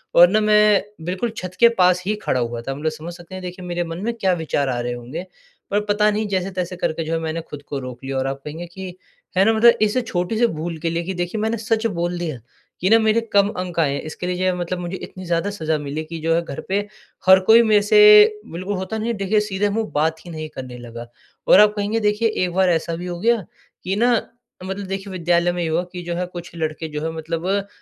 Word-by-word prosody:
और 175 +1 +9
ना 215 +2 +3
मैं 210 -1 +4 0.2
बिल्कुल 185 +6 -2
छत 185 0 -6
के 235 0 +8
पास 180 0 +4
ही 210 +1 0
खड़ा 130 - +1
हुआ 120 0 -3
था। 135 +3 -4
मतलब 155 +2 -2
समझ 160 +3 -8
सकते 175 +1 -11
हैं 185 - -6
देखिए 180 0 -7
मेरे 175 0 -2
मन 165 +1 -6
में 235 +1 -1
क्या 190 -5 +1
विचार 140 -3 -1
आ 120 -1 -1
रहे 120 0 -2
होंगे, 130 +9 -7 0.5
पर 205 +1 +2
पता 210 0 +3
नहीं 215 0 -1
जैसे-तैसे 185 -2 -2
करके 165 -1 -1
जो 165 - -3
है 165 - 0
मैंने 165 +1 -3
खुद 150 -2 -10
को 140 - -3
रोक 130 0 -8
लिया। 135 0 -3
और 130 0 0
आप 135 0 -4
कहेंगे 160 +4 -6
कि, 185 0 -8 0.4
है 195 - +5
ना 225 - +4
मतलब 235 +2 +7
इस 215 +3 +2
छोटी 180 +5 -1
सी 240 - +5
भूल 165 -1 -4
के 165 - -1
लिए 170 +1 -2
कि 190 +2 -4
देखिए 175 +4 -3
मैंने 220 +1 0
सच 225 +1 -1
बोल 175 +1 -1
दिया 155 -8 -4 0.4
कि 185 - +2
ना 225 0 +6
मेरे 220 +1 +3
कम 200 0 +5
अंक 180 -4 -4
आए 140 -4 +2
हैं, - - -3
इसके 155 +3 -6
लिए 180 - -1
जो 185 - -2
है 185 -1 +2
मतलब 180 0 -3
मुझे 175 +2 -4
इतनी 185 0 -9
ज़्यादा 170 +4 0
सज़ा 160 -5 -1
मिली 145 +2 -4
कि 165 0 -7
जो 165 +1 +1
है 170 - +2
घर 140 - -7
पे 200 +1 +2 0.5
हर 190 0 +9
कोई 230 +1 +8
मेरे 210 -2 +4
से 420 - +7
बिल्कुल 185 +4 -4
होता 190 +4 -4
नहीं 225 +2 -2
है 220 - -4
देखिए 200 +2 +1
सीधे 205 -1 -1
मुँह 220 +1 -2
बात 160 +2 0
ही 175 - -8
नहीं 155 -1 -5
करने 130 -2 -7
लगा। 120 0 -9 0.4
और - - +8
आप 210 0 +6
कहेंगे 210 +2 -1
देखिए 210 +2 +1
एक 180 -4 -1
बार 190 -1 +3
ऐसा 165 0 0
भी 175 +2 -6
हो 175 -1 -5
गया, 230 -1 +2 0.4
कि 190 +2 -1
ना 240 +3 +3 0.5
मतलब 190 +1 -5
देखिए 195 0 -5
विद्यालय 175 -1 +1
में 175 - -3
ये - - -1
हुआ 170 +3 +1
कि 180 -1 -6
जो 170 0 -3
है 180 +1 -1
कुछ 175 -1 -9
लड़के 160 0 -3
जो 150 - -3
है 160 - -2
मतलब 165 +2 -4
अ, 200 +1 0
180 Hz, 260 wpm, -21 LUFS, 160-205 Hz, 0.5 s, और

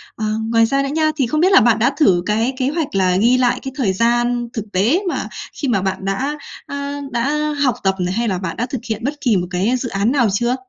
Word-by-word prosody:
ờ, 220 - -3 0.3
ngoài 230 0 +4
ra 275 +4 +1
nữa 275 - -2
nha, 310 +1 +1
thì 265 -5 +1
không 305 +6 0
biết 370 +3 +4
là 390 - +7
bạn 225 -1 +3
đã 240 +5 +2
thử 185 - +3
cái 225 +5 0
kế 260 0 0
hoạch 305 -6 -3
là 185 -1 +2
ghi 235 +6 +4
lại 250 -1 +2
cái 265 - -6
thời 215 -9 +1
gian 240 +3 +1
thực 220 -3 -4
tế 220 - +3
mà - - -3 0.3
khi 285 - -4
mà 215 -7 +1
bạn 190 0 -3
đã, 265 +10 -2 0.3
a, 280 0 -5
đã 300 +5 0
học 255 -5 +2
tập 190 0 +2
này, 180 0 -1
hay 235 +3 -1
là 190 -4 0
bạn 180 -2 -5
đã 240 - -1
thực 250 -1 -5
hiện 220 +1 -3
bất 280 +4 -1
kỳ 235 -7 +2
một 180 0 -2
cái 195 +7 +1
dự 250 -1 -4
án 200 +4 0
nào 245 -6 +2
chưa? 240 +4 +1
240 Hz, 265 wpm, -19 LUFS, 200-275 Hz, 0.3 s, là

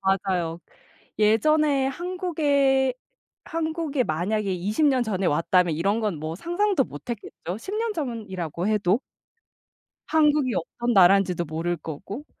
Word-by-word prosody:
맞아요. 185 -3 0 0.6
예전에 275 +6 +3
한국에 285 -5 +1 0.5
한국에 320 -4 -1
만약에 195 +4 -1
20 205 - 0
년 260 -4 +3
전에 195 -4 -2
왔다면 170 +2 +2
이런 195 +8 0
건 210 -7 -1
뭐 155 +2 -4
상상도 350 - +1
못했겠죠, 195 - -7
10 380 - -7
년 450 0 -1
전이라고 200 - -4
해도. 210 -1 +2 1.1
한국이 300 -5 +3
어떤 240 +7 -2
나라인지도 185 -2 +5
모를 165 +3 -2
거고. 170 - -7
215 Hz, 255 characters per minute, -25 LUFS, 180-295 Hz, 1.1 s, 나라인지도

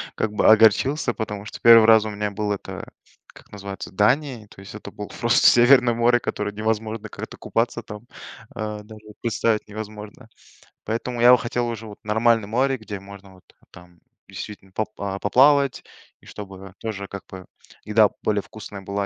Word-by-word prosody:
как 110 - -2
бы, - - +2
огорчился, 120 +4 +4
потому 105 -2 -5
что - - -9
1 115 -1 +8
раз 110 -1 +6
у - - -3
меня 105 0 -3
был, 105 0 -3
это, 100 - -6 0.4
как - - -19
называется, 100 -1 -8
Дания, 120 +2 0
то - - -17
есть 100 +2 -11
это 105 - -9
было 105 - -8
просто 120 0 +2
северное 120 0 +6
море, 120 +1 +3
которое 105 -2 -4
невозможно 110 0 -3
как-то - - -9
купаться, 120 +1 -2
там, 105 0 -9 0.5
э, 105 -1 -4
даже 110 0 -14 0.2
представить 110 -1 0
невозможно. 105 0 -9 0.6
Поэтому 120 +2 -3
я 120 +1 +8
бы 125 - +8
хотел 120 0 -2
уже 115 -1 -6
вот 105 - -12
нормальное 110 0 +2
море, 130 +4 0
где 105 -3 -8
можно 100 0 -13
вот 90 - -21 0.3
там 85 0 -17 0.3
действительно 95 -1 -9
попла 100 -2 -4
а, - - -6
поплавать, 140 +5 +3 0.4
и - - -24
чтобы 95 -2 -10
тоже, 100 -3 -5
как 100 - -8
бы, 95 -1 -10 0.4
еда 105 -1 +4
более 105 -1 +1
вкусная 105 -2 -10
была, 100 +1 -3
110 Hz, 175 wpm, -23 LUFS, 100-115 Hz, 0.6 s, 1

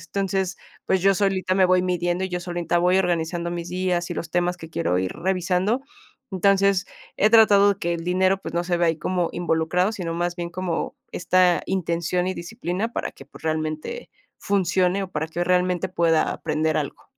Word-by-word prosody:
Entonces, 195 -2 -1 0.3
pues, 190 - +2
yo 195 0 +5
solita 190 -1 0
me 190 - +4
voy 185 0 +4
midiendo, 175 0 -1
y - - -3
yo 180 - -2
solita 175 -1 -2
voy 180 +2 +3
organizando 170 -1 -1
mis 170 0 -5
días 180 -1 -1
y - - -2
los 165 -1 -5
temas 175 0 0
que 160 - -9
quiero 90 - 0
ir 95 0 -2
revisando. 185 +6 0 0.5
Entonces, 195 0 +3 0.3
he 215 - +3
tratado 205 -3 +6
que 170 -1 -1
el 165 0 -5
dinero, 185 +2 +2
pues, - - -6
no 170 - +1
se 175 0 0
vea 170 -1 +2
ahí 160 -1 0
como 180 +1 -1
involucrado, 175 +2 +1
sino 175 -6 -4
más 175 +1 -2
bien 170 -1 -4
como 180 -2 -3 0.2
esta 180 -1 +3
intención 175 -1 -1
y 185 - -1
disciplina 195 +3 -4
para - - -3
que, 135 - -14
pues, - - -16
realmente 155 - -3 0.3
funcione 190 -1 +1
o - - -9
para 160 0 -3
que 170 +2 -3
realmente 180 -1 +1
pueda 170 -3 +2
aprender 155 0 -1
algo. 145 -2 -4
180 Hz, 190 wpm, -23 LUFS, 170-190 Hz, 0.5 s, tratado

